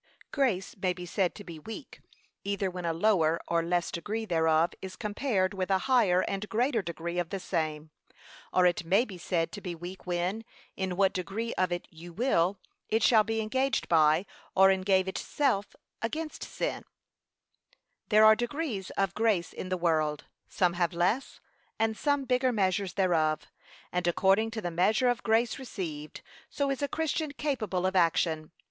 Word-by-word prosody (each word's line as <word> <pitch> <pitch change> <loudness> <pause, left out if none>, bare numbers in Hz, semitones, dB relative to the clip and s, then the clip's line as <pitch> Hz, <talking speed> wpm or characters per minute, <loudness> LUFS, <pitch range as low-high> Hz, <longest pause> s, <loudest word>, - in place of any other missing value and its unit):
Grace 235 -10 0
may 185 -1 +1
be 180 0 -8
said 180 0 0
to 205 - -9
be 170 -5 -9
weak, 225 - -9 0.4
either 200 -1 -1
when 180 -1 -6
a 165 - +1
lower 165 -2 +2
or 170 0 +2
less 175 +1 0
degree 215 +6 -3
thereof 160 -2 +2
is 190 -1 -7
compared 210 -3 -1
with 190 -1 -3
a 190 - +4
higher 220 -9 +4
and 195 +2 -3
greater 235 +1 +1
degree 170 0 -4
of 175 -2 -2
the 195 - -3
same; 155 -4 -3 0.6
or 185 - +4
it 175 -1 +2
may 190 +8 +3
be 190 -7 -10
said 165 -1 -1
to 205 - -8
be 180 -3 -5
weak 180 +3 -9
when, 180 +5 -1 0.3
in 190 -2 -3
what 195 -1 +3
degree 195 +6 -3
of 185 -1 0
it 175 0 -3
you 170 +2 -11
will, 195 -3 +1 0.3
it 220 +1 +1
shall 220 -3 +6
be 225 +1 -1
engaged 260 +5 0
by, 155 +2 +4 0.3
or 190 0 +7
engage 190 0 +2
itself 205 +1 -1 0.3
against 305 +7 -4
sin, - - -3
&c. - - -25 1.2
There 215 0 +6
are 215 0 +8
degrees 240 - -3
of 195 -1 +1
grace 215 -6 +1
in 185 - -6
the 185 - 0
world, 155 -3 0 0.2
some 180 -4 +1
have 175 0 0
less, 180 +10 0 0.4
and 225 0 +1
some 285 +2 0
bigger 255 0 +2
measures 195 -3 0
thereof, 165 -5 +1 0.5
and 180 0 -1
according 195 +5 +3
to 225 0 -5
the 175 -3 -3
measure 210 +9 +3
of 245 0 0
grace 225 +3 +1
received, 165 - -6 0.3
so 280 -1 -1
is 270 - -3
a 285 - +1
Christian 315 -1 -2
capable 220 -12 -2
of 190 0 0
action. 165 -3 +2
190 Hz, 175 wpm, -29 LUFS, 175-225 Hz, 1.2 s, are